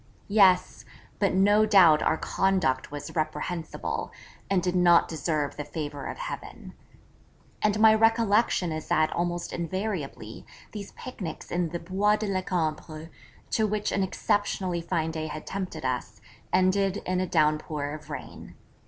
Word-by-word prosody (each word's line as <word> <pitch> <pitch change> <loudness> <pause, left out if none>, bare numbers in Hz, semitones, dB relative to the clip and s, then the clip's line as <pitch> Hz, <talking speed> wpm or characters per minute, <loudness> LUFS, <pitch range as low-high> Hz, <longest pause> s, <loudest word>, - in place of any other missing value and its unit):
Yes; 190 -4 +4 0.4
but 200 -3 +2
no 205 +3 +5
doubt 180 -7 +6
our 160 - +2
conduct 180 -11 0
was 145 +3 -7
reprehensible, 160 +1 -3 0.4
and 190 -3 +2
did 180 0 0
not 175 -1 +5
deserve 155 -3 -2
the 150 - -3
favour 145 -2 -5
of - - -6
Heaven. - - -7 0.9
And 215 0 +1
my 220 0 +7
recollection 225 -4 +3
is 155 0 -5
that 155 0 +2
almost 175 0 -2
invariably 170 - -4 0.3
these 205 -2 -7
picnics 185 -11 -7
in 175 -1 0
the 170 - -3
Bois 195 +5 +1
de 215 - -3
la 190 -2 -1
Cambre, 160 -3 -3 0.4
to 220 -1 +2
which 210 0 -1
an 200 - 0
exceptionally 190 -2 -1
fine 165 -2 -1
day 160 -1 -4
had 155 0 -7
tempted 185 -7 -5
us, 130 -1 -3 0.3
ended 190 +1 +2
in 185 0 0
a 185 - -1
downpour 155 -2 0
of 155 0 -10
rain. 150 - -8
180 Hz, 145 wpm, -27 LUFS, 155-200 Hz, 0.9 s, my